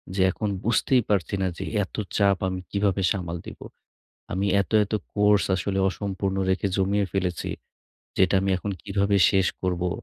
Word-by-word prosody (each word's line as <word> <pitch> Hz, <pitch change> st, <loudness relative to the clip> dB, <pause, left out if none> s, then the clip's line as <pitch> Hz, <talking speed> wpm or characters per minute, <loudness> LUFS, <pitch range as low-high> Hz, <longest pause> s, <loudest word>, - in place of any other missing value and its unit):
যে 95 Hz, -, +1 dB
এখন 105 Hz, +2 st, -3 dB
বুঝতেই 120 Hz, +2 st, +2 dB
পারছি 100 Hz, -2 st, +1 dB
না 95 Hz, -, +1 dB
যে -, -, -4 dB, 0.2 s
এত 95 Hz, -, -9 dB, 0.2 s
চাপ 100 Hz, -2 st, +3 dB
আমি 95 Hz, 0 st, -3 dB
কিভাবে 100 Hz, -1 st, +1 dB
সামাল 90 Hz, -4 st, -3 dB
দিব। -, -, -9 dB, 0.7 s
আমি 95 Hz, +2 st, 0 dB
এত 100 Hz, -, -8 dB
এত 105 Hz, -, -7 dB, 0.2 s
কোর্স 105 Hz, -1 st, +4 dB
আসলে 95 Hz, 0 st, -2 dB
অসম্পূর্ণ 95 Hz, 0 st, -3 dB
রেখে 95 Hz, +1 st, +1 dB
জমিয়ে 100 Hz, +1 st, +1 dB
ফেলেছি, 90 Hz, -3 st, -2 dB, 0.7 s
যেটা 95 Hz, 0 st, +3 dB
আমি 95 Hz, -, 0 dB
এখন 100 Hz, +3 st, -4 dB
কিভাবে 100 Hz, 0 st, +1 dB
শেষ 95 Hz, -1 st, +3 dB, 0.2 s
করবো! 90 Hz, -1 st, 0 dB
95 Hz, 160 wpm, -25 LUFS, 95-100 Hz, 0.7 s, কোর্স